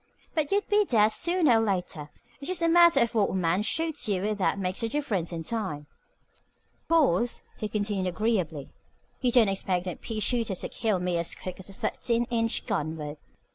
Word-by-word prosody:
But 305 -3 -1
you'd 405 +1 +1
be 420 0 +4
dead 220 - +4
sooner 335 -6 +3
or - - +1
later. 180 -7 -2 0.3
It's 280 - -6
just 365 -2 -1
a - - +4
matter 340 0 +6
of 235 -2 +1
what 215 -3 +2
a - - -3
man 180 +1 +1
shoots 300 +2 -1
you 190 -2 0
with 210 0 -1
that 195 - +1
makes 185 +2 -2
the 230 - -1
difference 215 - -2
in 165 -1 -4
time. 185 -8 -4 1.0
"Of - - -42
course," 245 - +2 0.2
he 215 - -2
continued 205 -2 -1
agreeably, 180 -7 -1 0.5
"you 250 -2 +2
don't 235 -3 +5
expect 190 -2 -1
no 180 - -2
pea 220 +4 -5
shooter 230 -3 0
to - - -5
kill 215 -5 0
me 180 -1 0
as 170 - -1
quick 185 0 -7
as 190 - -7
a - - -9
thirteen 235 +4 -1
inch 230 -1 0
gun 155 +2 -2
would. 150 -1 -6
215 Hz, 205 wpm, -27 LUFS, 180-245 Hz, 1.0 s, matter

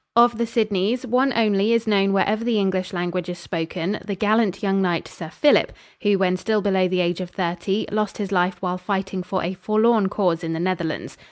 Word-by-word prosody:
Of 235 -1 +5
the 235 - 0
Sidneys, 220 +2 0
one 255 +3 +2
only 215 -1 +2
is 230 -1 +1
known 195 -2 +2
wherever 205 +3 +1
the 235 -2 +1
English 190 -2 0
language 175 -1 -3
is 175 - -5
spoken 175 +3 -3
the 200 - -4
gallant 210 -1 +1
young 195 -1 +1
knight, 175 -3 0
Sir 160 - -9
Philip, 290 - +3 0.3
who, 205 -2 +3
when 185 -1 +1
still 215 +1 0
below 190 -2 +2
the 185 0 0
age 175 +1 -1
of 180 - -5
thirty, 185 +3 -2
lost 210 -1 -1
his 205 -2 -4
life 180 -1 +1
while 180 0 -2
fighting 190 0 -2
for 185 +1 -3
a 175 +2 -2
forlorn 215 +1 +2
cause 180 -5 0
in 165 0 -2
the 160 - -3
Netherlands. 170 -3 -3
195 Hz, 205 wpm, -22 LUFS, 180-215 Hz, 0.3 s, Of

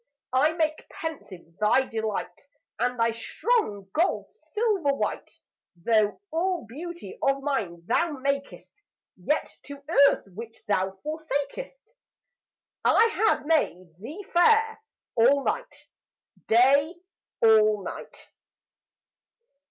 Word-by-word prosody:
I 290 +5 +3
make 315 -2 -2
pensive 185 - -8
thy 215 +5 +3
delight, 220 +3 -4 0.3
And 250 -1 0
thy 230 0 +3
strong 225 - -1
gold 340 +4 0
silver 425 -9 -1
white. - - -3 0.4
Though 210 +4 +1
all 345 -1 -1
beauty 345 - -8
of 275 0 +1
nine 195 -12 -2
thou 335 - +1
makest, 275 0 -3 0.4
Yet - - -2
to 280 0 -10 0.3
earth - - -3
which 225 +3 -9
thou 190 -1 0
forsakest 315 - -5 0.9
I 460 +1 +5 0.2
have - - +1
made 185 - 0
thee 305 - -8
fair 445 +5 +4 0.3
all 270 +5 +4
night, - - -4 0.6
Day 275 +8 +4 0.5
all 215 -2 +5
night. - - -9
280 Hz, 105 wpm, -26 LUFS, 220-340 Hz, 0.9 s, I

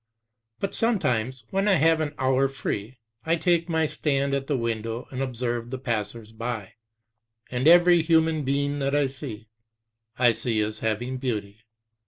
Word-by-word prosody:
But 195 - -2
sometimes, 130 - 0
when 195 +2 +1
I 200 - +5
have 160 -1 +4
an 145 -1 -3
hour 130 +1 +2
free, 130 -3 -4 0.3
I 165 +1 +2
take 170 +1 +1
my 160 -1 +2
stand 140 -2 0
at 135 0 -1
the 145 - +1
window 115 0 -3
and 130 0 -4
observe 120 -2 -2
the 130 - -4
passers 115 -3 -4
by; 110 -3 -5 0.8
and 125 +3 0
every 175 0 +7
human 160 -1 +2
being 140 +1 0
that 140 +1 0
I 145 -1 +3
see, 130 -5 -7 0.7
I 120 -1 +5
see 115 -1 -1
as 105 0 -3
having 120 +4 -2
beauty. 110 -5 -3
130 Hz, 160 wpm, -25 LUFS, 115-155 Hz, 0.8 s, every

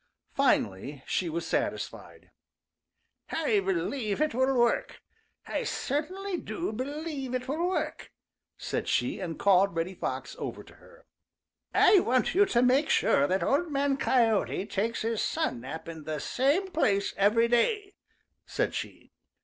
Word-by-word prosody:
Finally 130 +9 0
she 180 - -1
was 165 +1 -3
satisfied. - - -4 1.0
"I 295 -10 +1
believe 195 +5 -1
it 305 -3 +1
will 260 +2 +2
work. 240 -1 +1 0.5
I - - -2
certainly 365 +7 -2
do 350 - -4
believe 275 +1 -4
it 255 +1 -3
will 325 +6 0
work," 375 - -3 0.5
said - - -3
she, - - 0
and 165 -2 -4
called 195 -2 +4
Reddy 165 +3 -2
Fox - - -4
over - - -5
to - - -17
her. - - -19 0.7
"I 405 - +6
want 255 -6 +1
you 400 +3 +4
to 240 -8 +2
make 265 +4 +3
sure 140 - +3
that 190 +4 0
Old 315 +4 +1
Man 280 0 +1
Coyote 230 -7 +1
takes 215 +4 -2
his 225 -1 -1
sun 320 - -1
nap 145 +7 -7
in 160 -2 -8
the 155 -1 -3
same 295 - +1
place 205 - +1
every 215 +4 +3
day," 400 - +1 0.5
said - - -1
she. - - -7
250 Hz, 145 wpm, -28 LUFS, 195-305 Hz, 1.0 s, I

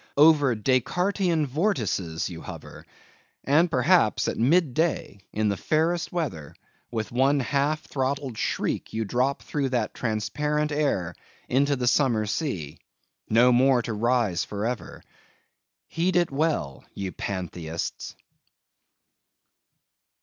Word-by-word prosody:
Over 145 -4 +5
Descartian 165 - +1
vortices 120 - -1
you 85 -2 -8
hover. - - -10 0.6
And 155 +6 +3
perhaps, 155 - +3
at - - -1
mid 145 +3 +3
day, 160 - -1
in 105 0 0
the 100 - -1
fairest 165 - 0
weather, 130 - -4 0.3
with 110 -2 -4
one 135 +4 +3
half 145 +3 0
throttled 135 -2 -2
shriek - - -2
you 110 0 -1
drop 125 +6 0
through 140 -3 -2
that 120 -4 -1
transparent 150 +7 -1
air 140 - 0 0.3
into 140 +3 +2
the 125 -2 -2
summer 120 -4 +2
sea, 100 - -3 0.5
no 120 +3 +5
more 125 0 +4
to 115 - -3
rise 110 -5 +1
for 105 +4 -4
ever. 120 -1 -5 0.8
Heed 175 +2 -1
it 175 -3 +2
well, 140 - -1
ye 95 -2 -4
Pantheists! 85 -4 -5
130 Hz, 120 wpm, -26 LUFS, 110-150 Hz, 0.8 s, Over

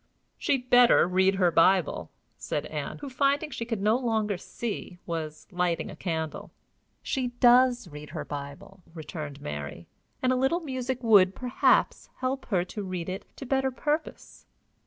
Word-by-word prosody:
"She'd 260 -3 -1
better 245 -6 +6
read 190 +1 +3
her 180 -3 +3
Bible," 185 +3 +3 0.3
said - - -3
Ann, - - -5
who, 285 - -5
finding 280 +4 +1
she 230 - -4
could 225 -4 -3
no 215 +2 +4
longer 220 -5 0
see, 195 -1 -6
was 160 -2 -5
lighting 175 -2 -1
a - - -9
candle. 160 -3 -4 0.5
"She 260 -2 -1
does 245 -2 +5
read 150 -1 -10
her - - -5
Bible," 140 +6 -8
returned 150 -3 -7
Mary; 75 - -6 0.4
"and 255 0 +3
a - - +1
little 265 +7 +1
music 260 -4 -3
would, 195 -4 +5
perhaps, 250 -1 +2
help 260 +1 -3
her 180 -5 +1
to 210 - -6
read 185 -2 -4
it 190 +2 -5
to 275 - -8
better 265 +1 +1
purpose." 300 +4 -4
210 Hz, 155 wpm, -27 LUFS, 175-255 Hz, 0.5 s, better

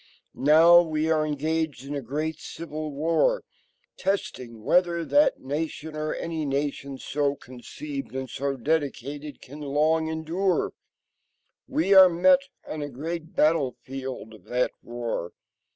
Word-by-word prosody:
Now 165 +5 +7
we 160 -1 0
are 155 -1 +2
engaged 150 -2 -2
in 140 - -5
a 140 - -2
great 150 +5 -3
civil 155 -2 -6
war.. 165 - +1 0.5
.testing 125 - -3
whether 170 +1 +2
that 295 +1 +3
nation, 150 +2 -4
or 155 0 -2
any 165 -2 -3
nation 140 -1 -2
so 140 +1 -1
conceived 275 - -8
and 130 0 -3
so 135 +2 -3
dedicated... 145 0 -2
can 145 +3 -11
long 155 +3 +1
endure. 165 +4 0 0.9
We 280 -8 +2
are 190 -1 +10
met 265 +12 +5 0.3
on 155 - -5
a 145 - -4
great 160 +5 -6
battlefield 135 -5 -1
of 105 -4 -16
that 125 +1 0
war. 120 -7 -4
155 Hz, 130 wpm, -26 LUFS, 135-165 Hz, 0.9 s, are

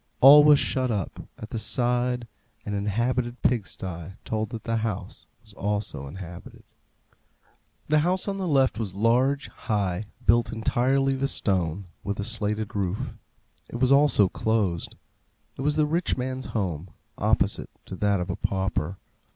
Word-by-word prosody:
All 145 +3 +10
was 150 -1 +7
shut 130 -2 0
up. 100 -6 -3
At 110 - -9
the 115 - -2
side 125 0 0 0.4
an 105 - -3
inhabited 120 +5 -1
pig 115 -6 +2
sty 90 0 -7
told 110 -1 -2
that 115 -1 -7
the 115 0 -1
house 110 -4 -4 0.2
was 110 -2 -11
also 100 -9 -3
inhabited. 90 +2 -10 1.2
The 155 0 +4
house 180 +5 +1
on 195 -1 -2
the 190 -2 -2
left 135 -6 +2
was 100 -5 -4
large, 125 +7 +2
high, 100 -2 -2 0.2
built 115 +1 +3
entirely 130 +4 +1
of 135 +1 0
stone, 95 -1 -1 0.2
with 100 0 -3
a - - -1
slated 105 -1 -1
roof. 100 0 -2 0.6
It - - -8
was 130 +1 +3
also 140 -8 +5
closed. 100 -4 -1 0.6
It - - -7
was 145 +2 +1
the 155 -1 +3
rich 165 +1 0
man's 130 +1 -3
home, 90 -5 -3 0.3
opposite - - +1 0.2
to 95 - -7
that 100 -1 +2
of 90 - -3
the - - -1
pauper. 95 -2 -1
110 Hz, 155 wpm, -26 LUFS, 100-130 Hz, 1.2 s, All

